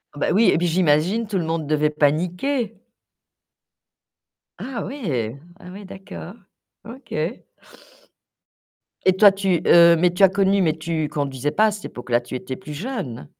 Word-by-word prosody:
Bah 145 - -1
oui 225 +4 +4
et - - +3
puis 175 - 0
j'imagine 175 +6 +1
tout 205 -2 -2
le 170 - -2
monde 160 -2 -3
devait 150 0 +1
paniquer? 180 - -1 1.8
Ah 255 -2 -5
ouais! 140 - -4 0.2
Ah 180 -3 -12
ouais, 200 +2 -10
d'accord, 190 -1 -10 0.5
OK. 235 +3 -12 1.9
Et 185 - +5
toi 205 +1 +7
tu 190 -3 0
heu, 170 0 +7
mais 180 +1 +3
tu 185 - +1
as 195 - +8
connu, 195 +1 +2
mais 160 -4 +2
tu 160 -1 -2
conduisais 140 -1 -3
pas 215 +5 +3
à - - 0
cette 205 0 -8
époque-là, 120 -1 -2
tu 120 +1 -8
étais 130 +1 -5
plus 150 - -9
jeune? 145 - -6
175 Hz, 155 wpm, -22 LUFS, 150-200 Hz, 1.9 s, as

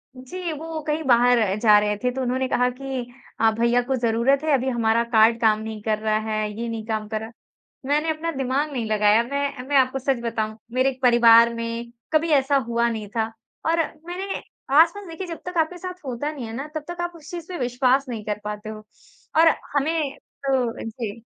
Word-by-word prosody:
जी, 335 +7 -6
वो 320 +1 -5
कहीं 305 +1 0
बाहर 245 -1 +5 0.2
जा 210 -2 +6
रहे 210 0 0
थे 250 - +2
तो 265 +1 -4
उन्होंने 260 +1 0
कहा 250 0 +2
कि, 265 0 -5 0.4
"अ, 225 0 +4
भैया 240 +1 +3
को 265 - +1
ज़रूरत 240 +4 +2
है 310 - +1
अभी 265 0 +2
हमारा 230 -1 +2
कार्ड 225 +1 +5
काम 215 -1 +4
नहीं 220 -1 -6
कर 215 0 0
रहा 215 0 +1
है, 215 0 -1
ये 235 - -2
नहीं 225 -1 -5
काम 215 -2 -3
कर 220 0 -2
रहा।" 220 +1 -8 0.5
मैंने 300 +3 +1
अपना 320 +1 -2
दिमाग 270 +2 -1
नहीं 240 -5 -2
लगाया। 210 +1 +4
मैं 280 0 -3
मैं 285 - -1
आपको 265 0 +2
सच 265 -1 0
बताऊँ 220 -1 -2 0.2
मेरे 255 0 +1
परिवार 235 -1 +6
में 230 0 -5 0.2
कभी 320 +1 +3
ऐसा 270 +2 0
हुआ 235 0 +1
नहीं 220 -3 -4
था, 220 0 0 0.3
और 330 +1 +2 0.3
मैंने 380 +3 -4 0.4
आसपास 340 +5 +4
देखिए 335 +3 -6
जब 335 -1 -6
तक 360 -1 -5
आपके 325 +2 +1
साथ 365 +1 -6
होता 265 +4 -3
नहीं 270 -6 -7
है 225 - -7
ना 275 +4 -5
तब 310 - -3
तक 345 0 -5
आप 345 - -2
उस 315 -1 -13
चीज़ 345 -2 -6
पे 360 - -4
विश्वास 255 +2 +2
नहीं 220 -3 -5
कर 210 -1 -2
पाते 210 0 -5
हो 215 0 -8 0.6
और 330 - +7 0.3
हमें 290 0 0 0.3
तो 255 -4 0
जी। 225 -1 -6
250 Hz, 210 wpm, -23 LUFS, 225-295 Hz, 0.6 s, और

